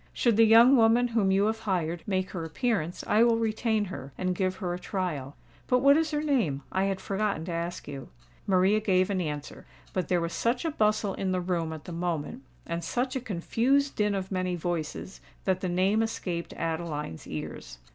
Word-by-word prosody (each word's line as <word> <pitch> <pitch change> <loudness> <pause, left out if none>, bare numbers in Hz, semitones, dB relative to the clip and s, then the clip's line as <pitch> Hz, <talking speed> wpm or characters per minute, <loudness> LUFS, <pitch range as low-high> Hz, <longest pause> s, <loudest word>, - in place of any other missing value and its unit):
Should 235 -3 +2
the 225 +1 +6
young 235 +4 +8
woman 235 +1 +4
whom 225 -4 +2
you 195 +1 +3
have 220 +1 0
hired, 175 -6 -1
make 185 -2 -1
her 170 -3 -4
appearance, 175 - -2
I 210 +2 +3
will 235 -1 +4
retain 220 -1 0
her, 140 -7 -8
and 185 0 0
give 185 0 -1
her 185 -3 -3
a 175 - -4
trial. 165 -9 -3 0.3
But 250 0 +2
what 280 +1 +7
is 320 0 +2
her 300 -1 -1
name? 210 - 0
I 190 +1 +1
had 195 -1 -1
forgotten 200 -5 -2
to 175 - -5
ask 170 +1 -4
you." 140 -2 -7 0.4
Maria 190 +2 +4
gave 185 -2 +2
an 190 -2 0
answer; 150 -3 -5 0.3
but 185 -4 -1
there 180 - +2
was 170 0 -3
such 240 +5 0
a 325 - 0
bustle 215 -5 +1
in 190 0 -2
the 185 - +1
room 175 -3 -1
at 155 -2 -7
the - - -7
moment 170 - -3 0.2
and 170 0 -3
such 250 +10 -1
a 260 - -1
confused 250 +7 +1
din 210 -1 +1
of 190 0 -4
many 185 -1 -1
voices, 175 +1 -4 0.2
that 185 -1 +1
the 185 - -1
name 190 +5 +2
escaped 180 -6 -3
Adeline's 160 - -4
ears. - - -7
190 Hz, 205 wpm, -28 LUFS, 170-225 Hz, 0.4 s, young